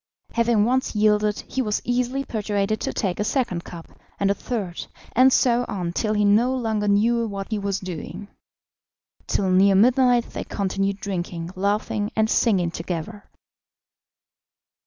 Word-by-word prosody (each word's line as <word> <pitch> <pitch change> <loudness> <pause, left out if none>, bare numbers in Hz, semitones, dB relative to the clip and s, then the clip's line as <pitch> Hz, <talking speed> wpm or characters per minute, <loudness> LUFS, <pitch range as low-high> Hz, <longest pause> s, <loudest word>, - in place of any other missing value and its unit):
Having 235 -2 +2
once 255 0 0
yielded, 210 0 +2
he 260 - -3
was 210 -4 0
easily 250 +2 -1
persuaded 210 -1 -1
to - - -2
take 190 -4 -2
a - - +1
second 210 -8 -1
cup, 170 -1 -10 0.3
and 200 0 +2
a - - +3
third, 200 -6 -5 0.3
and 255 +2 +6
so 245 -1 +3
on 180 -5 -3
till 215 +3 0
he 210 0 +2
no 230 +6 +3
longer 220 -4 -1
knew 230 +3 +2
what 200 0 -6
he 215 - 0
was 200 -1 -2
doing. 185 +2 -7 1.0
Till 190 -2 0
near 195 +1 +5
midnight 245 +3 +4
they - - -4
continued 195 0 -2
drinking, 175 -3 -4
laughing, 205 +2 -1
and 220 0 +2
singing 185 -7 +2
together. 175 +5 -6
210 Hz, 150 wpm, -23 LUFS, 195-235 Hz, 1.0 s, and